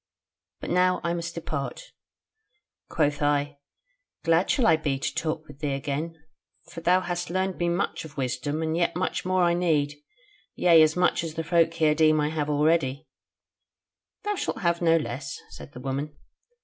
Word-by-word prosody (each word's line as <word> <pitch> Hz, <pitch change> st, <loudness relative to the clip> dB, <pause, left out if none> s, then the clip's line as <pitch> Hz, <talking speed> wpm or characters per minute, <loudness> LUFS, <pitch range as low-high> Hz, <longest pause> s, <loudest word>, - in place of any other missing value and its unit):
But -, -, -5 dB
now 180 Hz, +1 st, +3 dB
I 170 Hz, -, 0 dB
must 170 Hz, -1 st, -4 dB
depart.' 160 Hz, -, -5 dB, 1.0 s
Quoth 145 Hz, -2 st, 0 dB
I: 145 Hz, 0 st, 0 dB, 0.6 s
'Glad 165 Hz, +2 st, +3 dB
shall 255 Hz, -, +2 dB
I 165 Hz, -, +6 dB
be 150 Hz, -4 st, -1 dB
to 135 Hz, -, -3 dB
talk 155 Hz, -1 st, -2 dB
with 145 Hz, -1 st, -14 dB
thee 145 Hz, -2 st, -1 dB
again; 145 Hz, +4 st, -3 dB, 0.6 s
for 165 Hz, -, -8 dB
though -, -, -25 dB
thou 185 Hz, -, +4 dB
hast 175 Hz, -1 st, -3 dB
learned 185 Hz, +1 st, -1 dB
me 175 Hz, 0 st, +1 dB
much 175 Hz, +3 st, -1 dB
of 150 Hz, -2 st, -12 dB
wisdom, 145 Hz, +5 st, -2 dB
yet 170 Hz, 0 st, +1 dB
much 185 Hz, +1 st, -2 dB
more 185 Hz, 0 st, +2 dB
I 170 Hz, 0 st, +3 dB
need; 150 Hz, -4 st, 0 dB, 0.5 s
yea, 170 Hz, -2 st, +6 dB
as 155 Hz, 0 st, +4 dB
much 180 Hz, -1 st, +2 dB
as 160 Hz, -1 st, -5 dB
the 165 Hz, -, -2 dB
folk 165 Hz, 0 st, +3 dB
here 155 Hz, -2 st, +3 dB
deem 155 Hz, 0 st, +4 dB
I 150 Hz, 0 st, +1 dB
have 150 Hz, -1 st, -2 dB
already.' 150 Hz, -1 st, +1 dB, 1.2 s
'Thou 415 Hz, 0 st, 0 dB
shalt 400 Hz, -, -3 dB
have 170 Hz, -2 st, +1 dB
no 165 Hz, -1 st, +4 dB
less,' 135 Hz, 0 st, -4 dB
said -, -, -12 dB
the -, -, -9 dB
woman. 135 Hz, +3 st, -4 dB
160 Hz, 175 wpm, -26 LUFS, 145-170 Hz, 1.2 s, I